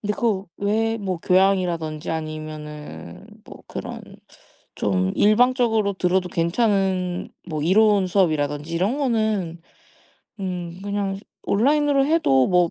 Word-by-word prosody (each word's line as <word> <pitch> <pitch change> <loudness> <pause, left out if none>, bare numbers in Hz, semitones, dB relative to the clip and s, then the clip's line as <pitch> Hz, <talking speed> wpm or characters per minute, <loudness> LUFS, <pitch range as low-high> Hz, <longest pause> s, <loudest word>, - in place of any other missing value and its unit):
근데 210 0 -1
그 205 -5 0
외에 220 +2 0
뭐 190 -3 -2
교양이라든지 175 -4 +1
아니면은 150 - -7 0.2
뭐 - - -13
그런 - - -7 0.7
좀 95 -2 0
일방적으로 225 -1 +3
들어도 180 0 0
괜찮은 185 0 0 0.2
뭐 155 -3 -3
이론 200 +3 +4
수업이라든지 155 -4 0
이런 195 +11 0
거는 215 - -1 0.8
음 180 -2 -4
그냥 200 -1 -2 0.3
온라인으로 280 +5 +3
해도 210 - +3
뭐 180 -2 +3
185 Hz, 260 characters per minute, -23 LUFS, 165-215 Hz, 0.8 s, 이론